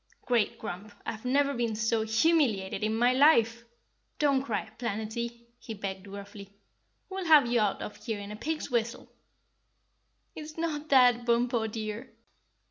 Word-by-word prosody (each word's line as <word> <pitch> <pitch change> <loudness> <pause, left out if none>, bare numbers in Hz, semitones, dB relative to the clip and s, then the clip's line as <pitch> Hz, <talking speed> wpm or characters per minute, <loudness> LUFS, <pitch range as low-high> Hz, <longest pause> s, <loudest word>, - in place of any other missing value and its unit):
"Great 240 -4 +1
Grump, 205 +4 -7
I've 220 +2 -6
never 280 +2 +2
been 235 -3 -1
so 225 +1 +1
humiliated 220 - +1
in 215 +1 0
my 245 +2 +3
life. 235 -5 +4 0.5
Don't 280 -3 +2
cry, 225 -6 -3
Planetty," 235 +1 -4
he 225 -2 -7
begged 195 -1 -5
gruffly, 200 0 -9 0.6
"we'll 380 -1 -5
have 305 -5 +7
you 235 0 +1
out 210 -2 0
of 210 - -7
here 225 -4 -4
in 200 0 -8
a - - -6
pig's 305 +5 -4
whistle." 235 0 -2 1.2
"It's 310 0 -9
not 310 -2 -3
that, 245 -3 +5
Bumpo, 235 -1 +1
dear." 215 0 -6
235 Hz, 145 wpm, -29 LUFS, 215-265 Hz, 1.2 s, have